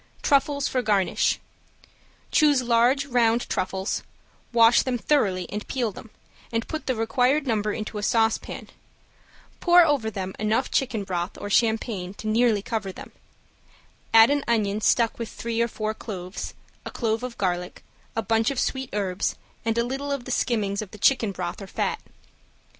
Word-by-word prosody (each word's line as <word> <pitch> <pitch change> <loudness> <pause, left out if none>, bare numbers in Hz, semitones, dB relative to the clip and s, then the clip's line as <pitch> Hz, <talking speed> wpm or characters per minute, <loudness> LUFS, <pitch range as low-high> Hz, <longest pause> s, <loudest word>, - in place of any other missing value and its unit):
~TRUFFLES 280 -1 +2
FOR 255 - 0
GARNISH~ 205 -5 +1 0.9
Choose 290 -4 +4
large 245 +4 +3
round 240 -3 +2
truffles, 190 +2 -2 0.5
wash 230 0 +6
them 255 -2 -1
thoroughly 205 -9 +1
and 210 +1 -5
peel 240 -5 -1
them, 220 - -12 0.4
and 230 0 -1
put 315 -1 -5
the 260 - +1
required 250 +6 +1
number 215 -4 0
into 215 0 -4
a - - -4
saucepan, 225 0 0 0.9
pour 350 -1 +6
over 280 -8 +1
them 190 -3 -5
enough 215 +5 0
chicken 245 -6 0
broth 180 -1 -3
or 205 - -6
champagne 220 -4 +1
to - - -10
nearly 215 -1 +2
cover 215 -4 -3
them, - - -11 1.0
add 225 +3 +7
an 285 -1 +1
onion 215 -3 +1
stuck 230 +2 +2
with 230 - -4
three 230 0 -3
or 235 - +2
four 215 -1 -3
cloves, 190 -4 -7 0.3
a - - -6
clove 225 -1 -1
of 250 -1 -6
garlic, 180 -2 -2 0.3
a 225 - -1
bunch 225 +2 +2
of 275 -3 -2
sweet 265 -1 -1
herbs, 195 -3 -1 0.3
and 225 0 0
a 235 - +3
little 270 +3 -3
of 275 -3 -3
the 255 - -5
skimmings 210 -5 0
of 215 - -7
the 210 - -12
chicken 225 -2 +3
broth 180 0 -5
or 195 - -7
fat. - - -2
225 Hz, 165 wpm, -25 LUFS, 205-250 Hz, 1.0 s, add